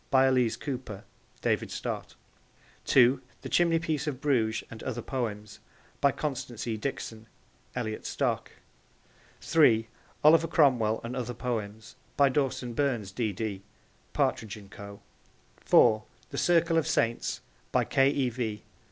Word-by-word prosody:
By 130 0 +5
Elise 125 -4 +2
Cooper. 125 -8 -6 0.4
(David - - 0
Stott.) - - -5 0.7
(2) 130 0 +5 0.2
The - - -5
Chimneypiece 165 -3 +1
of 135 -4 -3
Bruges 120 -7 +1
and 115 - -9
Other 120 -3 -4
Poems. 105 -5 -4 0.4
By 140 - +5
Constance 130 -6 -4
E. 115 -2 -1
Dixon. 110 -2 -5 0.5
(Elliot 110 -3 -3
Stock.) - - -1 0.9
(3) 115 -9 +4 0.3
Oliver 160 +2 +6
Cromwell 125 -9 +3
and 120 +2 -5
Other 125 -2 -3
Poems. 110 -3 -4 0.2
By 140 -1 +5
Dawson 130 -3 -1
Burns, 120 -7 -1
D.D. 105 -2 -3 0.5
(Partridge 110 -1 -1
and 100 -2 -14
Co.) 100 0 -10 0.6
(4) 110 0 +4 0.3
The - - -5
Circle 170 -1 +3
of 160 - -2
Saints. 115 -7 0 0.3
By - - +3
K. 135 0 +3
E. 140 -3 +1
V. 110 -3 -4
125 Hz, 130 wpm, -28 LUFS, 110-140 Hz, 0.9 s, Oliver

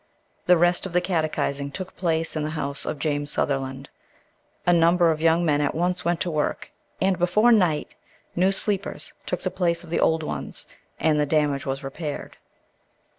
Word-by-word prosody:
The 180 0 +6
rest 175 +2 +2
of 185 - -11
the 180 - +4
catechizing 155 -5 -1
took 185 +5 -7
place 165 -2 -1
in 155 - -1
the 150 - -2
house 140 -1 -2
of - - -2
James 145 -1 -1
Sutherland. 135 -1 -2 0.8
A 175 - +5
number 170 0 +4
of 155 - -2
the - - -5
young 165 +1 +4
men 145 -2 +2
at 145 - 0
once 180 +2 0
went 170 0 0
to 175 - -1
work, 150 -1 -2 0.3
and 190 -1 +1
before 210 +7 +4
night 180 -9 +2 0.4
new 185 +2 +3
"sleepers" 200 0 -1
took - - -2
the - - -2
place 170 -2 0
of 165 - -12
the - - +1
old 160 0 +2
ones, - - -5 0.3
and 155 -1 +2
the 150 - +1
damage 145 -2 +1
was 135 +1 -3
repaired. 145 +2 -6
165 Hz, 185 wpm, -24 LUFS, 150-180 Hz, 0.8 s, The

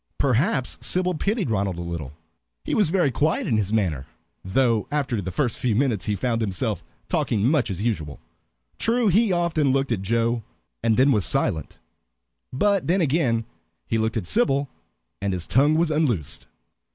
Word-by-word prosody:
Perhaps 135 - +1
Sybil 180 0 0
pitied 200 - -1
Ronald 95 -4 -1
a - - -4
little. 85 -5 -5 0.5
He - - -2
was 205 -7 +4
very 170 -5 +2
quiet 155 +6 0
in 115 - +1
his 105 -2 -1
manner, 85 -11 0 0.4
though 115 +3 +1
after 135 -7 -1
the 95 - -4
first 120 +4 -1
few 120 -4 +1
minutes 120 -6 +1
he 105 - 0
found 115 +3 -1
himself 95 - -2 0.2
talking 105 0 +1
much 140 -5 +2
as 95 +1 -4
usual. 80 -11 -2 0.6
True, 230 -1 +2
he 210 +3 +3
often 170 -5 +1
looked 135 -1 0
at 105 -5 0
Joe, 115 +3 0 0.4
and 115 -1 +2
then 135 +3 +5
was 105 -6 +2
silent; 110 - -1 0.7
but 195 +8 +1
then 180 +4 +2
again 130 -8 +1 0.4
he 115 - -1
looked 110 +1 0
at 105 - -3
Sybil, 135 - +2 0.5
and 100 -1 -1
his 90 -2 -3
tongue 145 +4 +3
was 165 0 +2
unloosed. 90 - -1
120 Hz, 170 wpm, -24 LUFS, 100-150 Hz, 0.7 s, then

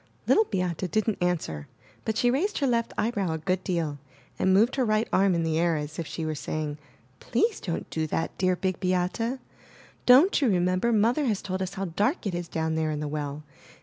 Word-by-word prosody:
Little 440 - +4
Beate 180 - -2
didn't 215 +3 0
answer, 155 - -1 0.4
but 220 -1 -1
she 245 +1 +3
raised 360 +11 0
her 285 - +1
left 235 -3 +1
eye 230 - +1
brow 195 -8 -1
a - - -2
good 185 +3 -1
deal 160 -5 -2 0.4
and 190 - +3
moved 215 +6 +4
her 265 - +1
right 215 -1 +1
arm 190 -1 +4
in 165 - 0
the 160 0 0
air 170 -1 +2
as 150 +2 -5
if 165 - -3
she 155 +2 -4
were 155 - -1
saying, 150 0 -4 0.4
*Tlease 445 -1 0
don't 170 -4 -3
do 160 -1 -1
that, 165 - -2
dear 185 -1 +2
Big 185 0 -2
Beate! 185 +7 0 0.7
Don't 280 +9 +6
you 265 - +3
remember 185 +4 +2
Mother 235 +7 +2
has 215 -6 0
told 190 0 -3
us 185 - -3
how 195 - -2
dark 205 - 0
it 195 - -1
is 175 0 -3
down 160 -1 -2
there 160 -1 0
in 150 -1 -2
the 150 - -3
well? 145 0 -4
185 Hz, 215 wpm, -27 LUFS, 160-220 Hz, 0.7 s, Don't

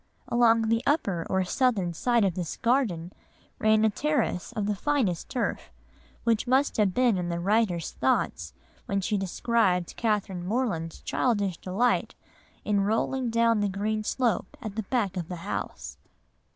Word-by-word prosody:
Along 230 -1 +4
the 230 0 +2
upper 200 - 0
or 190 0 +2
southern 195 -3 +1
side 235 +4 +2
of 190 - +1
this 175 -2 -4
garden 215 -9 0 0.5
ran 215 0 +4
a - - +5
terrace 260 -8 -1
of 210 - -2
the 210 - +1
finest 210 - -1
turf, 250 - -3 0.5
which 230 +1 +1
must 265 +3 +2
have 205 -4 +2
been 245 -6 +3
in 175 -1 -3
the 170 0 -2
writer's 190 -3 +1
thoughts 80 -3 0 0.4
when 200 - 0
she 210 +2 -1
described 195 -2 +1
Catherine 205 -5 -1
Morland's 185 -6 -2
childish 205 -8 0
delight 205 +7 0 0.5
in 205 -1 +2
'rolling 235 +5 0
down 230 -1 +3
the 205 -1 +1
green 215 +3 -2
slope 230 -4 -1
at 215 -3 -6
the 220 - -1
back 205 -7 0
of 170 -3 -3
the 180 - -5
house. - - -5
210 Hz, 155 wpm, -27 LUFS, 185-235 Hz, 0.5 s, a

